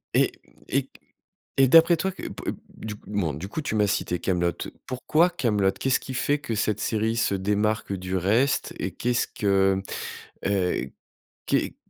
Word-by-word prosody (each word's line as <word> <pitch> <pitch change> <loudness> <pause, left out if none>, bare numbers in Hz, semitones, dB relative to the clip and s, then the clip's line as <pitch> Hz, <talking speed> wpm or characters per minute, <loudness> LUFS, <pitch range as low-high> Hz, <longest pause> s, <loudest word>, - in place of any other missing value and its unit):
Et - - +4 0.4
et - - 0 0.7
et 135 - +6
d'après 165 +3 +7
toi, 190 +3 -1
que - - -11
p - - -4 0.2
du 105 -1 -7
coup - - -17
bon, 90 -7 0
du 80 +7 -6
coup 155 - -3
tu 135 -7 -2
m'as 105 - +4
cité 95 -3 0
Kaamelott. 85 -2 -1 0.2
Pourquoi 155 +7 +2
Kaamelott? 105 - +1
Qu'est-ce 130 -1 +2
qui 130 - -7
fait 145 +3 +1
que 130 -6 -3
cette 105 -1 0
série 110 +1 0
se 100 - +2
démarque 105 +2 0
du 95 0 -3
reste? 110 +10 +2
Et - - -2
qu'est-ce 120 0 0
que 95 -1 +2 0.6
heu, 95 -9 +1 0.6
qu'est - - 0
105 Hz, 165 wpm, -26 LUFS, 95-130 Hz, 0.7 s, d'après